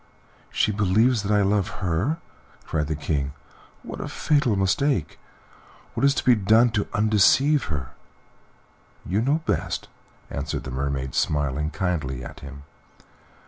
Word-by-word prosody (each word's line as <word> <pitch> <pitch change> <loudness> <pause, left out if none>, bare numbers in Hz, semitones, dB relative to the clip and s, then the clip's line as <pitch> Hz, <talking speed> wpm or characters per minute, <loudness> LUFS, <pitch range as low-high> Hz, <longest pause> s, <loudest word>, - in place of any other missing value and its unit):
"She - - +1
believes 105 +4 +2
that 100 +1 -2
I 105 -1 +4
love 100 -1 +1 0.2
her!" 95 - 0 0.5
cried 75 -2 -1
the 80 - -1
King. 70 -2 -2 0.5
"What - - -7
a - - -4
fatal 145 -8 +1
mistake! 95 - 0 0.7
What - - -3
is 140 0 +4
to - - -1
be 125 - +6
done 110 +3 +4
to 105 -2 -1
undeceive 110 +7 +3
her?" 70 -6 -4 1.1
"You 100 +5 0
know 145 +6 +1
best," - - -2 0.4
answered 70 +2 -3
the 65 - -6
Mermaid, 65 0 -2
smiling 75 0 0
kindly 75 -9 -2
at - - -9
him. 70 0 -10
95 Hz, 140 wpm, -24 LUFS, 75-115 Hz, 1.1 s, be